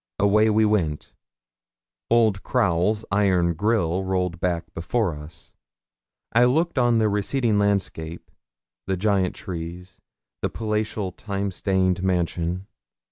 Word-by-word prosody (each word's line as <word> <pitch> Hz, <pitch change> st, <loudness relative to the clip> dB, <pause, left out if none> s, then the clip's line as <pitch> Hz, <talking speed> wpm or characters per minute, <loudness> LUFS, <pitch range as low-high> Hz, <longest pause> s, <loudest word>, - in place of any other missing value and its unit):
Away 105 Hz, +2 st, +4 dB
we 110 Hz, 0 st, +3 dB
went. 85 Hz, -8 st, -1 dB, 1.0 s
Old 110 Hz, -4 st, +3 dB
Crowle's 105 Hz, -2 st, +1 dB
iron 95 Hz, -4 st, +2 dB
grille 95 Hz, -1 st, 0 dB
rolled 90 Hz, -2 st, -1 dB
back 85 Hz, -2 st, -2 dB
before 90 Hz, +3 st, -1 dB
us. 75 Hz, +3 st, -12 dB, 0.8 s
I 120 Hz, +2 st, +6 dB
looked 155 Hz, +4 st, +1 dB
on 120 Hz, -2 st, +3 dB
the 110 Hz, -1 st, +3 dB
receding 105 Hz, +2 st, +1 dB
landscape, 95 Hz, -5 st, -2 dB, 0.6 s
the 95 Hz, -, 0 dB
giant 95 Hz, -1 st, +1 dB
trees 90 Hz, +1 st, -7 dB, 0.4 s
the -, -, 0 dB
palatial, 105 Hz, -3 st, -2 dB
time 100 Hz, +1 st, -4 dB
stained 95 Hz, -1 st, 0 dB
mansion. 90 Hz, 0 st, -1 dB
95 Hz, 115 wpm, -24 LUFS, 85-110 Hz, 1.0 s, I